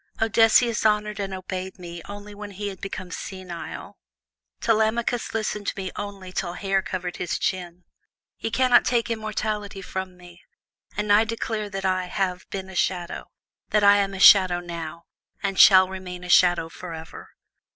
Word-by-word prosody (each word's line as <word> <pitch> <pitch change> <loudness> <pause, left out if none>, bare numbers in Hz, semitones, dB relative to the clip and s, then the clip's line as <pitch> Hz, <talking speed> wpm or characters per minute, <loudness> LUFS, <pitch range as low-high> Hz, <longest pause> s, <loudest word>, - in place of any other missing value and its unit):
Odysseus 225 +1 +4
honored 210 -1 +1
and 195 -1 -3
obeyed 185 0 -5
me 175 -2 -8
only 205 0 -9
when 205 0 -8
he 205 +1 -5
had 190 -2 -10
become 190 -2 -6
senile. 185 -4 -7 0.6
Telemachus 225 +2 0
listened 210 -2 -2
to - - -2
me 190 -1 -4
only 200 -2 -7
till 175 -1 -3
hair 195 +1 0
covered 180 -2 -5
his 175 - -2
chin. 180 -2 -3 0.6
Ye - - -2
cannot 245 +1 +4
take 235 -2 0
immortality 215 -2 -3
from 185 0 -5
me, 175 0 -15 0.6
and 210 -1 +2
I 210 +2 +6
declare 220 -1 -3
that 195 -1 -5
I 185 -1 +1
have 185 0 -3
been 190 -1 -5
a 190 - -11
shadow, 175 -1 -2 0.4
that 210 -1 +2
I 200 0 +7
am 195 -1 0
a - - -6
shadow 185 -2 +7
now, 170 -1 -7 0.4
and 195 -2 -1
shall 190 -1 +8
remain 185 -1 -7
a 180 - -8
shadow 175 -2 +5
forever." 165 -1 -10
195 Hz, 160 wpm, -24 LUFS, 180-210 Hz, 0.6 s, shall